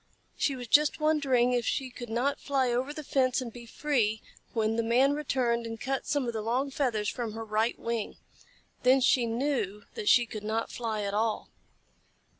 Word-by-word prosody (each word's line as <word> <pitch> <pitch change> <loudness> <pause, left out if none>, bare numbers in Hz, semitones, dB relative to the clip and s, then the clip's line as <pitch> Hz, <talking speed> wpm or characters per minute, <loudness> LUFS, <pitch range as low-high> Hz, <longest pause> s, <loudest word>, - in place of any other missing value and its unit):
She 275 - 0
was 245 -2 -7
just 300 +6 +4
wondering 275 -6 +2
if 245 -1 +1
she 260 +3 -2
could 240 -1 -8
not 245 +5 0
fly 265 -3 +1
over 255 +4 -1
the 305 0 -7
fence 260 -2 +1
and 240 -3 -6
be 235 -1 -10
free, 225 -6 0 0.3
when 220 -1 0
the 230 - +1
Man 250 +5 +3
returned 250 -5 0
and 225 0 -6
cut 270 +2 -2
some 285 -3 0
of 235 - -2
the 220 - -2
long 250 +6 -1
feathers 235 -7 0
from 235 -2 -3
her 225 0 -6
right 220 +2 0
wing. 230 -2 -3 0.6
Then 255 +1 +5
she 245 -1 +3
knew 225 -5 -1
that 445 -2 -1
she 240 -1 +6
could 215 -2 -7
not 220 +2 -2
fly 220 -3 -3
at 200 0 -2
all. 220 +1 -1
240 Hz, 195 wpm, -29 LUFS, 225-270 Hz, 0.6 s, she